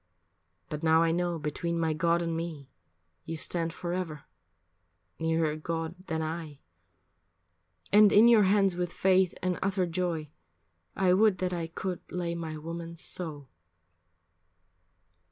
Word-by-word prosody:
But 150 - -5
now 160 0 +4
I 165 - +2
know 175 0 0
between 165 +3 -3
my 160 -1 +1
God 170 +2 +1
and 165 -1 -2
me 160 -5 -5 0.5
You 165 0 -5
stand 165 +1 -2
forever, 175 -3 -4 1.0
nearer 160 -1 +1
God 165 +1 -3
than 160 -2 -1
I, 155 -2 -5 1.4
And 210 -1 +8
in 220 +3 +7
your 225 -4 +6
hands 195 -1 +3
with 175 -1 -2
faith 185 -1 +2
and 180 -2 0
utter 190 -1 +1
joy 170 -3 -2 0.6
I 185 -1 +3
would 205 0 +4
that 180 0 -1
I 170 -2 -2
could 180 +2 -4
lay 175 -1 -2
my 165 -2 -5
woman's 165 +1 -7
soul. 150 -6 -5
170 Hz, 135 wpm, -29 LUFS, 160-180 Hz, 1.4 s, And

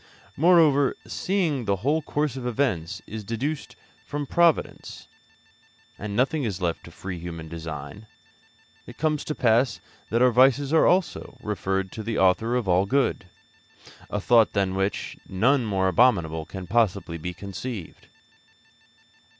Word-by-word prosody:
Moreover, 155 -4 +4
seeing 180 -6 -1
that 120 - -5
the 100 - +1
whole 155 +3 +2
course 150 -2 -2
of 125 -2 -4
events 105 - -1
is 110 0 -7
deduced 135 +8 -4 0.3
from 145 0 -4
providence, 170 +2 0 0.9
and 105 -1 -5
nothing 140 +5 +1
is 100 -6 -3
left 85 -2 -2
free 90 +2 -7
to - - -10
human 85 -2 -7
design, 80 +4 -7 0.8
it - - -11
comes 155 -1 0
to 150 - -3
pass 120 +2 +2 0.3
that 115 +2 +2
our 125 - +5
vices 135 +4 +4
also 165 -4 +2
are - - -11
referred 95 -2 -1
to 110 - -6
the 110 +1 -3
Author 105 +6 +3
of 120 -5 -1
all 95 +2 +3
good 135 -7 0 0.8
a 105 - -2
thought 115 +2 +4
than 95 -2 0
which 95 +1 -2
none 120 +7 +2
more 95 -3 +1
abominable 85 -7 +2
can 95 -1 -7
possibly 100 -5 0
be 90 +3 -4
conceived. 100 0 -7
110 Hz, 145 wpm, -25 LUFS, 95-140 Hz, 0.9 s, our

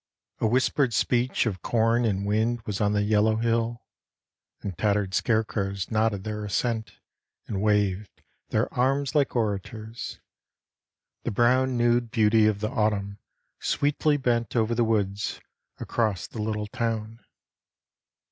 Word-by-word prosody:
A - - +2
whispered 130 +1 +2
speech 125 +1 +1
Of 95 -6 -2
corn 115 +1 +2
and 100 -2 0
wind 110 +3 0
was 105 -1 -4
on 105 0 +2
the 105 0 +2
yellow 105 +1 +3
hill, 115 +1 0 0.8
And 95 -3 -4
tattered 100 -1 0
scarecrows 100 -3 0
nodded 110 -3 +1
their 105 0 -4
assent 110 +2 -1 0.5
And 100 -2 -3
waved 105 -1 +1 0.4
their - - 0
arms 135 +2 +1
like 145 -4 +1
orators. 110 +1 -3 1.0
The - - -3
brown 125 +3 +2
Nude 120 0 +2
beauty 110 -2 +4
of 105 -1 0
the 110 - -1
Autumn 105 -4 -1 0.4
sweetly 145 +1 +1
bent 120 -4 0
Over 115 0 +2
the 120 0 +2
woods, 105 -3 -1 0.4
across 110 -6 -1
the 110 - -7
little 105 0 -2
town. 115 -1 -3
110 Hz, 130 wpm, -26 LUFS, 105-120 Hz, 1.0 s, beauty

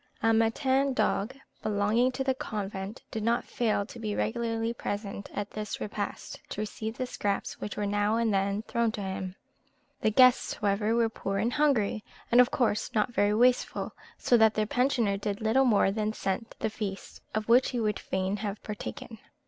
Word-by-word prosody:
A 225 0 +4
mâtin 260 +4 +2
dog 225 +3 0 0.3
belonging 215 +4 +2
to 270 - -2
the 265 0 +2
convent 205 -3 -5
did 220 - -3
not 230 +2 +1
fail 215 -4 0
to 235 - -11
be 215 -2 -3
regularly 230 0 -1
present 200 -3 -5
at 205 0 -4
this 210 -1 -5
repast, 205 -1 -5
to 210 - -4
receive 220 +1 -5
the 255 - -1
scraps 205 -5 -3
which 205 - -5
were 210 - 0
now 205 +1 +1
and 230 -2 +1
then 200 +2 0
thrown 235 -1 0
to 205 - -4
him. 190 -1 -4 0.7
The - - +3
guests, 255 +3 +5
however, 210 +2 +1
were 235 -1 +3
poor 195 -3 -3
and 225 +5 0
hungry, 250 -8 +2 0.3
and 245 +1 +8
of 250 - +3
course 230 -6 0
not 215 +3 +1
very 205 -1 +2
wasteful, 245 +2 +2 0.2
so 245 - +3
that 220 -1 +5
their 215 - +1
pensioner 240 -4 +1
did 200 0 -3
little 230 +4 +3
more 210 -5 +4
than 215 +1 -1
scent 195 +2 -3
the 220 - -2
feast, 200 -3 -6
of 215 0 -1
which 245 +3 +5
he 245 - -2
would 215 -2 0
fain 190 +2 -2
have 205 0 -5
partaken. 225 +2 -7
215 Hz, 185 wpm, -29 LUFS, 205-235 Hz, 0.7 s, and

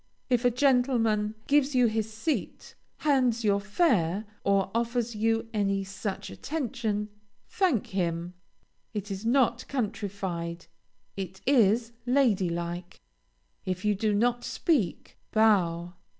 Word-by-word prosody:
If 245 -1 +3
a 245 - +5
gentleman 240 -5 +2
gives 285 -1 +2
you 250 -1 +5
his 220 -1 0
seat, 225 +8 -3 0.2
hands 255 -6 +2
your 200 -2 +3
fare, 205 - +1 0.2
or 195 -1 +2
offers 235 0 -1
you 225 +1 +1
any 195 -2 +1
such 195 0 -5
attention, 235 -8 -3 0.4
thank 345 - +1
him. 175 -2 -2 0.6
It 205 0 -4
is 195 +3 -4
not 250 -1 +2
countrified, 195 -8 -3 0.5
it 190 -1 -6
is 230 -3 +3 0.2
lady 240 -9 +3
like. 175 +1 -5 0.6
If 185 +1 -3
you 210 - +3
do 210 +2 0
not 240 +3 +1
speak, 265 - -1
bow. 180 -6 +2
215 Hz, 120 wpm, -28 LUFS, 195-245 Hz, 0.6 s, a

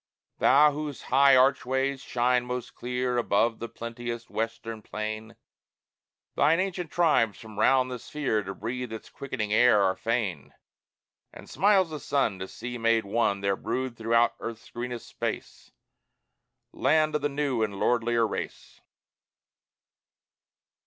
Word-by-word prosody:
Thou, 150 +3 +6
whose 150 -1 -5
high 135 0 +7
archways 130 +1 +2
shine 125 0 +1
most 125 -1 -5
clear 125 0 -2
Above 115 0 +1
the 115 - -5
plenteous 115 0 -6
Western 115 0 -4
plain, 110 +1 -5 1.0
Thine 165 +3 +3
ancient 185 -3 -2
tribes 150 -12 +2
from 110 -2 -10
round 130 -1 +3
the 125 - -5
sphere 135 -5 -1
To 100 0 -7
breathe 125 +2 -4
its 110 - -8
quickening 110 -6 -4
air 120 -1 +5
are 95 -1 +2
fain: 115 -6 -2 0.8
And - - -12
smiles 195 -4 +3
the 155 - -5
sun 135 -9 0
To 95 - -5
see 120 +4 -7
made 115 -1 +2
one 100 -1 0
Their 100 0 +1
brood 130 +4 -3
throughout 115 +1 +2
Earth's 115 -1 -7
greenest 120 0 -5
space, - - -5 1.0
Land 155 +4 +2
of 150 - 0
the 145 - 0
new 140 -4 -1
and 105 -2 -1
lordlier 115 +2 +1
race! 110 - -6
120 Hz, 135 wpm, -27 LUFS, 110-135 Hz, 1.0 s, high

